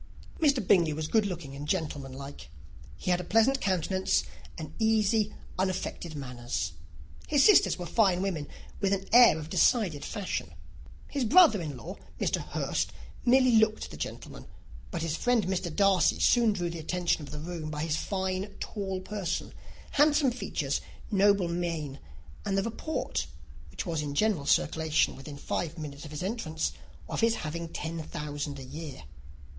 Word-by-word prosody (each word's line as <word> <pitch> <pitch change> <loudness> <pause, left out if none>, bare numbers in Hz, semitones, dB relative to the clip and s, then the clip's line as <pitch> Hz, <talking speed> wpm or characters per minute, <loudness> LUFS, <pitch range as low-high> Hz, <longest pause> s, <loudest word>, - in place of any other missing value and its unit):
Mr. 280 - +3
Bingley 170 -5 +5
was 155 +1 -3
good 215 +3 +2
looking 160 -7 -6
and 145 +1 -6
gentlemanlike: 140 -5 -4 0.5
he 180 - -1
had 180 0 +2
a - - -6
pleasant 225 +8 +3
countenance, 190 0 +1 0.3
and 155 -4 -7
easy, 220 -1 +3 0.3
unaffected 185 -3 -2
manners. 120 - -3 0.6
His 285 -2 +4
sisters 420 - +6
were 175 - -5
fine 190 -2 +2
women, 165 -7 -2 0.3
with 200 -1 +1
an 195 0 -1
air 240 -8 +8
of 155 0 -7
decided 185 - +3
fashion. 205 -4 -4 0.5
His 280 -2 -2
brother 270 - +6
in 150 -5 -5
law, 175 +10 -8 0.2
Mr. - - +1
Hurst, - - -2 0.3
merely 255 -1 +5
looked 220 0 +2
the - - -8
gentleman; - - -7 0.4
but 170 -3 -3
his 165 -1 -1
friend 245 0 +2
Mr. 185 -1 -1
Darcy 195 -2 +3
soon 235 -3 +4
drew 175 -3 -2
the 170 - -6
attention 175 +1 0
of 145 - -8
the 150 - -7
room 160 0 -5
by 150 0 -3
his 160 -1 0
fine, 190 +1 -2
tall 190 -3 -4
person, 190 -3 -3 0.4
handsome 295 -2 +4
features, 245 - -2 0.3
noble 200 -2 +4
mien, 165 -5 -3 0.4
and 195 -1 0
the 195 - +2
report, 230 +8 -3 0.4
which - - -5
was 165 -4 -1
in 145 -1 -4
general 195 -7 +1
circulation 160 -1 +2
within 140 +1 -9
five 165 +3 -3
minutes 145 -2 -7
after 150 - -8
his 150 - -4
entrance, 185 -6 -2 0.4
of - - -2
his 230 0 +4
having 165 +2 -4
ten 165 0 -4
thousand 145 -2 -5
a 135 - -8
year. 145 - -8
180 Hz, 160 wpm, -29 LUFS, 155-210 Hz, 0.6 s, air